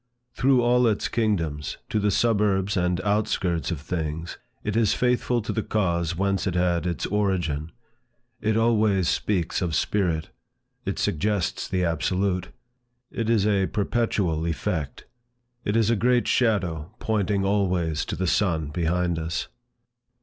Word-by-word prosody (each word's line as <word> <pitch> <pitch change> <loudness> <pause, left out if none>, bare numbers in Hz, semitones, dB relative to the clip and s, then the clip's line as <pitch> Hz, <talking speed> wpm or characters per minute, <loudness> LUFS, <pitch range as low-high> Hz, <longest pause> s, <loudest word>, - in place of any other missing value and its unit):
Through 125 +1 +3
all 120 0 +4
its 105 -2 +1
kingdoms, 85 - -1
to 110 - 0
the 105 0 +2
suburbs 100 -2 +2
and 90 -1 +1
outskirts 100 -4 0
of 85 -5 -2
things, 80 +1 -4 0.2
it 105 - -2
is 115 -3 +3
faithful 125 -1 +1
to - - -3
the 110 - 0
cause 85 -6 0
whence 100 +1 0
it 90 - -1
had 90 -1 +1
its 85 - -2
origin. 90 -7 -1 0.7
It 110 +1 +1
always 110 -5 +3
speaks 95 -4 0
of 85 -4 -1
Spirit. 85 -5 0 0.6
It - - -1
suggests 100 +1 -1
the 90 -1 0
absolute. 90 +2 0 0.6
It 115 -1 -2
is 110 -4 +3
a 100 -3 +2
perpetual 100 -7 0
effect. 80 -3 -3 0.6
It 105 - -1
is 115 -1 +3
a - - +3
great 120 +3 +2
shadow 95 - 0
pointing 100 -2 0
always 90 -6 +1
to - - -4
the 95 - -2
sun 85 -5 +1
behind 85 +1 0
us. 80 0 -3
95 Hz, 140 wpm, -25 LUFS, 85-105 Hz, 0.7 s, all